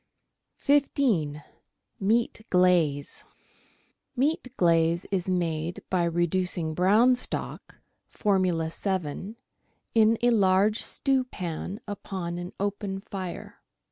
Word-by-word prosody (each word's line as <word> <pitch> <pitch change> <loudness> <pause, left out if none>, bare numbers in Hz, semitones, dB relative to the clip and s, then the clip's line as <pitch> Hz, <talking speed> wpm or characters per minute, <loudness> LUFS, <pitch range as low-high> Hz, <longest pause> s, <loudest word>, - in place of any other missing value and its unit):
15— 240 - +1 0.6
MEAT 225 +3 +1
OLAZE 175 -6 +2 0.9
Meat 275 +2 0
glaze 165 0 +2
is 185 -1 0
made 170 -2 -2
by 180 -2 +2
reducing 175 -1 0
brown 210 +9 +4
stock 250 - -2 0.3
(Formula 185 -5 0
7) 190 +2 -3 0.6
in 225 0 +4
a 245 - +5
large 205 0 +3
stewpan 210 -8 -2
upon 185 -4 -5
an 175 +1 -6
open 200 -1 -3
fire. 190 -3 -7
185 Hz, 90 wpm, -27 LUFS, 170-215 Hz, 0.9 s, a